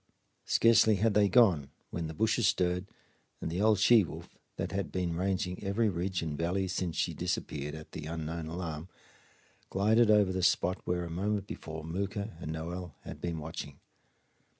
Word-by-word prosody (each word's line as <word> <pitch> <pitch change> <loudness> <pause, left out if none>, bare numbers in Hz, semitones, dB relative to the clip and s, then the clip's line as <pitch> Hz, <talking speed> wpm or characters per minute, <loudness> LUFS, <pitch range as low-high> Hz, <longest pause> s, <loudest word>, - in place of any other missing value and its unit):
Scarcely 110 -1 +5
had 110 +2 +2
they 100 -1 +4
gone 95 - +4 0.2
when 85 -1 -3
the 80 - -7
bushes 110 +4 +2
stirred 90 -2 +1 0.5
and 80 - -4
the 90 +4 -1
old 110 0 +5
she 110 +2 +6
wolf, 85 - -9 0.2
that - - -3
had 100 0 -2
been 90 -2 -1
ranging 95 +1 -1
every 105 +3 +1
ridge 90 -1 -2
and 80 -2 -3
valley 90 +5 0
since 90 -2 -2
she - - 0
disappeared 75 +1 -3
at 80 0 -10
the 75 - -6
unknown 80 0 -4
alarm, 80 -1 -5 0.8
glided 110 +4 +3
over 105 -3 +5
the 95 0 -1
spot 90 +1 +2
where 90 0 -1
a 85 - -7
moment 100 +3 -1
before 80 -5 -7
Mooka 100 +4 -3
and 80 -2 -5
Noel 85 0 -5
had - - -9
been 85 -1 -2
watching. 75 -2 -7
90 Hz, 175 wpm, -31 LUFS, 80-100 Hz, 0.8 s, she